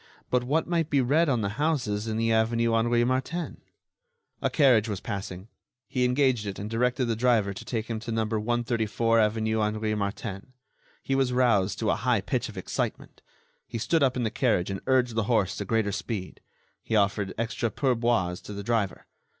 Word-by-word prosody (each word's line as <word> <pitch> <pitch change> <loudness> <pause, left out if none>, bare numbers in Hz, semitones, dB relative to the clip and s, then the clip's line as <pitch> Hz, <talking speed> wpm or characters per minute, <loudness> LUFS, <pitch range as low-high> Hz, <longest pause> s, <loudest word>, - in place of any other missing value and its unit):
But 125 -1 +2
what 150 +6 +1
might 165 -2 0
be 140 - +3
read 145 +6 +3
on 125 -4 +1
the 105 +6 -3
houses 125 -9 0
in 110 0 -2
the 115 0 +1
avenue 115 +1 +2
Henri 120 +1 +3
Martin? 130 +8 -2 0.8
A - - +1
carriage 125 -7 +4
was 100 -3 -3
passing. 95 -1 -6 0.4
He 125 -1 0
engaged 125 -4 +2
it 100 - -4
and 100 - -5
directed 125 +3 +1
the 115 -1 0
driver 110 -4 +2
to - - -8
take 115 -3 -3
him 115 -2 -4
to 115 +1 -6
No. 110 -1 0
134 115 0 0
avenue 110 0 +1
Henri 110 0 0
Martin. 100 +2 -4 0.5
He 135 - -1
was 135 -2 +2
roused 115 -6 +2
to 110 -2 +1
a - - +2
high 115 -1 +1
pitch 125 +4 -2
of 105 - -11
excitement. 95 - -4 0.5
He 115 - -5
stood 160 +8 +1
up 130 -2 +2
in 125 - 0
the 110 - -1
carriage 105 -8 +1
and 95 - -4
urged 125 -2 +3
the 110 -2 0
horse 110 -6 +2
to 100 - -3
greater 110 0 +1
speed. 95 0 -5 0.4
He 115 - -2
offered 100 -1 +1
extra 115 +1 -1
pourboires 115 -9 0
to 105 - -7
the 100 0 -6
driver. 105 -3 -1
115 Hz, 190 wpm, -27 LUFS, 105-125 Hz, 0.8 s, carriage